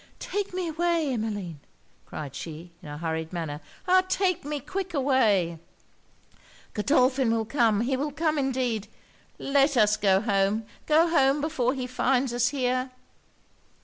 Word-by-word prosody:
'Take 405 +1 -3
me 365 -1 -3
away, 330 -3 0
Emmeline!' 205 - -4 0.5
cried 145 -3 -7
she, 165 +4 -8
in 150 - -10
a 145 - -6
hurried 160 0 -3
manner 160 -4 -4 0.3
'ah! 370 +1 +6
take 370 -3 +1
me 295 +1 -3
quick 370 +5 -5
away! 215 - +2 1.1
Godolphin 255 +2 +2
will 225 -1 0
come, 230 -4 +2
he 260 +3 0
will 290 +3 -2
come 310 +1 0
indeed. 250 -6 -1 0.5
Let 275 0 +2
us 215 -1 +4
go 195 -3 +3
home 205 +1 +1 0.2
go 320 +2 +5
home 280 -4 +3
before 285 -4 0
he 255 -2 -3
finds 255 0 0
us 245 0 +2
here!' 255 -1 -1
255 Hz, 145 wpm, -26 LUFS, 205-290 Hz, 1.1 s, ah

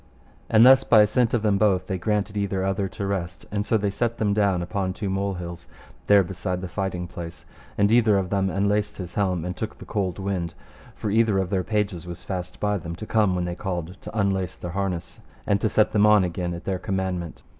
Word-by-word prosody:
And 115 +1 +7
thus 135 +1 +8
by 110 -2 +6
assent 115 +3 +2
of 115 - -1
them 100 -2 +2
both 100 -3 +3
they 95 -2 -3
granted 105 +2 -1
either 100 -2 -1
other 95 0 0
to 100 +2 -5
rest; 90 -3 -3
and 100 0 0
so 110 - +2
they 100 -1 -1
set 115 +3 -1
them 105 -2 +1
down 100 -4 +2
upon 95 0 -2
two 100 0 -3
mole 100 0 -1
hills 85 -1 -7 0.4
there 100 -1 +6
beside 90 0 -4
the 95 - -4
fighting 90 -1 -3
place, 85 -1 -8 0.3
and 100 +1 +3
either 110 -3 +5
of 95 -2 -2
them 95 -1 +1
unlaced 100 +2 0
his 90 -2 -6
helm, 90 -4 0
and 90 0 -3
took 110 0 -5
the - - -11
cold 95 -5 -2
wind; 95 -4 -3 0.4
for 105 - -3
either 110 -2 +3
of 95 -2 -1
their 95 -2 +1
pages 100 -4 -2
was 85 0 -7
fast 90 -1 -5
by 105 -1 0
them, 85 0 -6
to 100 - -7
come 105 -4 +2
when 90 -1 -1
they 90 - -3
called 90 -1 -5
to - - -7
unlace 95 -2 0
their 90 - -6
harness 90 -2 -3 0.3
and 100 -1 +1
to 110 - +2
set 110 +1 +3
them 105 0 +4
on 105 -2 +6
again 90 0 -2
at 85 - -8
their 95 -2 -2
commandment. 95 -4 -3
95 Hz, 230 wpm, -24 LUFS, 90-105 Hz, 0.4 s, thus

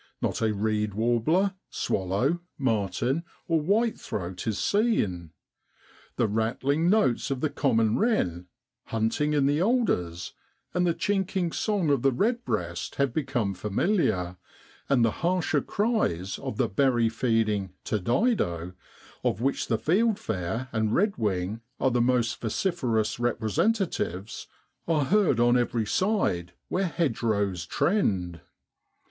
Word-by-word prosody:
Not - - -2
a 110 -1 +2
reed 105 0 -1
warbler, 120 - +2 0.2
swallow, 100 - 0 0.2
martin, 125 - 0 0.2
or 165 -2 +2
whitethroat 150 - -1
is 110 -3 0
seen. 110 - +1 0.9
The 120 - +2
rattling 130 - 0
notes 200 - +2
of 135 -2 -1
the 150 +1 -1
common 115 -6 +2
wren, 90 - 0 0.4
hunting 115 +7 0
in 145 -2 +3
the 145 +3 +2
alders, 175 - 0 0.4
and 180 0 +2
the 170 - +1
chinking 190 -3 0
song 195 -7 0
of 140 -4 +2
the 135 +1 +3
redbreast 130 - -1
have 140 -3 +1
become 125 -9 -1
familiar, 95 - 0 0.5
and 125 -4 +4
the 115 - +2
harsher 170 -4 +1
cries 200 - -1
of 105 - -5
the - - +2
berry 120 +2 +2
feeding 110 -5 0
Turdidce 105 - 0 0.5
of - - 0
which 135 +4 0
the 115 - +1
fieldfare 130 - 0
and 110 -1 0
redwing 110 - 0 0.2
are 130 - +2
the 120 0 +2
most 120 -1 +1
vociferous 120 - 0
representatives, 120 - -1 0.4
are 155 -4 +2
heard 195 - +3
on 120 +1 +4
every 120 -2 +1
side 105 - 0 0.2
where 190 +1 0
hedgerows 110 - -1
trend. 90 - 0
120 Hz, 120 wpm, -27 LUFS, 105-170 Hz, 0.9 s, and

